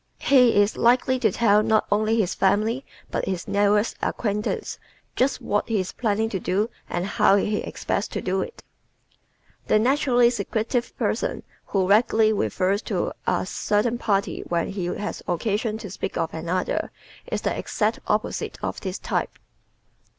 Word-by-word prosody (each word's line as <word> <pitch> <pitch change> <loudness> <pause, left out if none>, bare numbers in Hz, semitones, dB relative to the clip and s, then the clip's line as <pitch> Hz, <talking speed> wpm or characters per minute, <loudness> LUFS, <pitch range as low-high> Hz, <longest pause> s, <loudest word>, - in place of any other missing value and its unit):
He 250 -6 +5
is 205 +1 +2
likely 255 +2 +3
to 220 -5 +3
tell 210 0 +4
not 215 0 +2
only 215 +2 +2
his 190 -4 +1
family 215 +7 +1 0.3
but - - -1
his 185 -2 -3
newest 205 +2 +2
acquaintances 210 -2 -2 0.4
just 265 +2 +1
what 205 +3 -1
he 220 -2 +1
is 185 0 -3
planning 220 -2 0
to 195 - -2
do 205 +6 0 0.2
and 175 - -2
how 195 0 +4
he 205 +1 +1
expects 200 - -2
to - - -4
do 190 +1 -1
it. - - -7 1.0
The - - +4
naturally 245 0 +3
secretive 235 +2 -2
person - - -1 0.2
who 190 -2 +1
vaguely 220 +1 +4
refers 200 0 0
to - - -1
"a - - +1
certain 225 +3 0
party" 200 -4 0
when 170 -1 0
he 195 -3 -3
has 205 +4 -4
occasion 210 +5 -1
to 205 -4 -8
speak 195 - -4
of 165 -1 -1
another 170 +3 -2 0.4
is - - -1
the - - 0
exact - - -1
opposite - - -1
of - - -3
this 190 0 -4
type. - - -2
210 Hz, 160 wpm, -24 LUFS, 195-225 Hz, 1.0 s, He